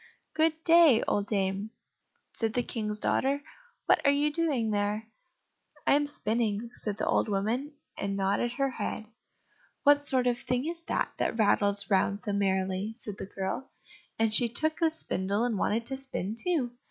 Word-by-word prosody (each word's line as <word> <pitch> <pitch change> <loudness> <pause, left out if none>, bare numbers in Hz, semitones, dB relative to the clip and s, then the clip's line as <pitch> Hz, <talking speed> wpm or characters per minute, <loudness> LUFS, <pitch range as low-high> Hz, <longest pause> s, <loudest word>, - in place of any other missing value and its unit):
"Good 320 0 +1
day, 330 -8 +6
old 205 0 0
dame," 195 0 -1 0.6
said 225 -1 -2
the 245 - +1
King's 215 -3 -3
daughter; 275 +6 0 0.4
"what - - +4
are 280 - +5
you 290 +1 +1
doing 285 -9 0
there?" 210 +1 -1 0.8
"I - - +4
am 290 +1 +3
spinning," 225 -3 -2
said 210 -2 -5
the - - -2
old - - +1
woman, 225 +9 -1 0.2
and 200 0 -3
nodded 200 +5 0
her 275 +1 0
head. 215 -2 -4 0.8
"What 290 -1 +6
sort 265 -3 +1
of 245 -1 +1
thing 250 +2 -1
is 335 +1 -2
that, - - 0
that - - -1
rattles 205 -1 +2
round 200 +1 +1
so 205 - -2
merrily?" 190 +1 -1
said 210 -4 -7
the - - -6
girl, 195 +7 -4 0.5
and 225 -1 +1
she 235 +1 +5
took 310 +7 +2
the 330 -2 +3
spindle 200 - 0
and 240 -2 0
wanted 225 +3 0
to 265 +2 -3
spin 255 -7 -2
too. 285 -3 0
225 Hz, 170 wpm, -29 LUFS, 205-275 Hz, 0.8 s, day